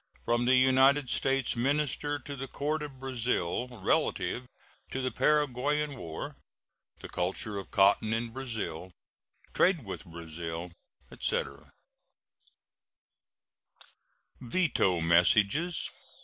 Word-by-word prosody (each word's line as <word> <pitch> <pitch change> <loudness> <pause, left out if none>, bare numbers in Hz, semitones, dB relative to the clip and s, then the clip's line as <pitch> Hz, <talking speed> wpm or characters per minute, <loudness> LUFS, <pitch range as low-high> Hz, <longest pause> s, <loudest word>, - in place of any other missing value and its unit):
from 120 +1 +2
the 130 +1 +5
United 130 +1 +4
States 135 -2 +1
minister 145 +3 0
to 140 0 -8
the 135 0 -5
Court 150 +4 -2
of 140 -3 -7
Brazil 125 -5 -1
relative 125 +2 -1 0.4
to 130 - -3
the 130 -1 -1
Paraguayan 150 0 +1
war, 80 -10 -7 0.6
the - - -7
culture 100 +4 -3
of 95 - -9
cotton 100 +2 +4
in 115 +1 -1
Brazil, 110 -9 -4 0.6
trade 170 - +3
with 95 - -6
Brazil, 85 0 -6 0.4
etc.] - - -3 2.7
VETO 120 - +1
MESSAGES. 100 - +3
125 Hz, 100 wpm, -30 LUFS, 95-140 Hz, 2.7 s, the